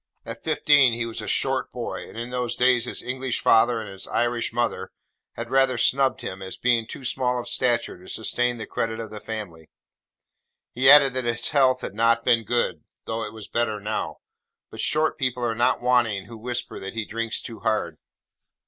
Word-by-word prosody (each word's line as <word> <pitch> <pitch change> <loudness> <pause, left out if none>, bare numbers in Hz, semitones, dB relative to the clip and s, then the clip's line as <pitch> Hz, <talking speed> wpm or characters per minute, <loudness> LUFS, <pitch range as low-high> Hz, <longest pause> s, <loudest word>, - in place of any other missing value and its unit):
At 115 0 -8
fifteen 145 -5 +4
he 115 0 -2
was 115 -1 -5
a 105 - -7
short 130 -2 0
boy, 120 -2 -6
and - - -12
in 120 +2 -5
those 125 -1 -2
days 125 -1 +3
his - - -4
English 130 0 -2
father 115 +1 +4
and 110 - -6
his 95 -1 -7
Irish 120 0 0
mother 115 -5 -1 0.4
had 115 0 -7
rather 135 -2 +3
snubbed 130 +2 +2
him, 95 +1 -6
as 95 0 -7
being 120 -2 +1
too 130 - -8
small 125 0 0
of 120 - -7
stature 120 -7 0
to 95 - -13
sustain 120 +2 -1
the 110 - -5
credit 115 0 -3
of 110 -2 -6
the 105 - -7
family. 90 -9 -7 1.0
He 130 +2 +5
added 140 -2 +8
that 130 -1 -2
his 120 0 0
health 130 -3 +3
had - - -5
not 115 +2 +2
been 115 -2 +3
good, 95 -10 -1 0.2
though 115 0 -3
it - - -6
was 110 -2 -10
better 115 -3 -1
now; 105 +1 -3 0.5
but - - -10
short 155 +1 0
people 125 -2 -1
are 115 - 0
not 120 +2 +1
wanting 120 -6 +2
who 115 - -11
whisper 120 +2 -4
that 95 +3 -7
he 110 -1 -2
drinks 115 +1 -2
too 115 -2 -8
hard. 110 -1 -1
120 Hz, 200 wpm, -24 LUFS, 110-125 Hz, 1.0 s, added